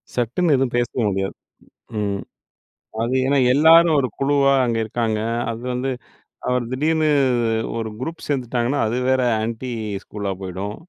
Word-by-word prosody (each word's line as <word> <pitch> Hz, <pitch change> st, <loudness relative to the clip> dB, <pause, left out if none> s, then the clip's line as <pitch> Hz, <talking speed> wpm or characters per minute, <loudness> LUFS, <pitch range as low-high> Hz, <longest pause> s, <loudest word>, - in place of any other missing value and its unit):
சட்டுன்னு 135 Hz, +7 st, +1 dB
எதுவும் 130 Hz, -2 st, 0 dB
பேசவே 120 Hz, 0 st, -1 dB
முடியாது. 95 Hz, 0 st, -2 dB, 0.6 s
ம் 100 Hz, -1 st, -2 dB, 0.8 s
அது 120 Hz, +3 st, -1 dB
ஏன்னா 140 Hz, 0 st, +3 dB, 0.2 s
எல்லாரும் 160 Hz, +2 st, +6 dB
ஒரு 130 Hz, -, +1 dB
குழுவா 140 Hz, 0 st, +3 dB
அங்க 115 Hz, -1 st, 0 dB
இருக்காங்க. 110 Hz, -1 st, -1 dB, 0.3 s
அது 115 Hz, -, -7 dB
வந்து 130 Hz, +2 st, -1 dB, 0.6 s
அவர் 125 Hz, -1 st, +1 dB
திடீர்னு 155 Hz, +3 st, +1 dB, 0.7 s
ஒரு 110 Hz, -1 st, -3 dB
குரூப் 165 Hz, +5 st, -6 dB
சேர்ந்துட்டாங்கன்னா, 125 Hz, 0 st, 0 dB
அது 115 Hz, +3 st, -1 dB
வேற 130 Hz, 0 st, +3 dB, 0.2 s
ஆன்டி 115 Hz, +3 st, -4 dB, 0.3 s
ஸ்கூலா 100 Hz, -2 st, -4 dB
போய்டும். 95 Hz, +3 st, -5 dB
125 Hz, 130 wpm, -21 LUFS, 110-140 Hz, 0.8 s, எல்லாரும்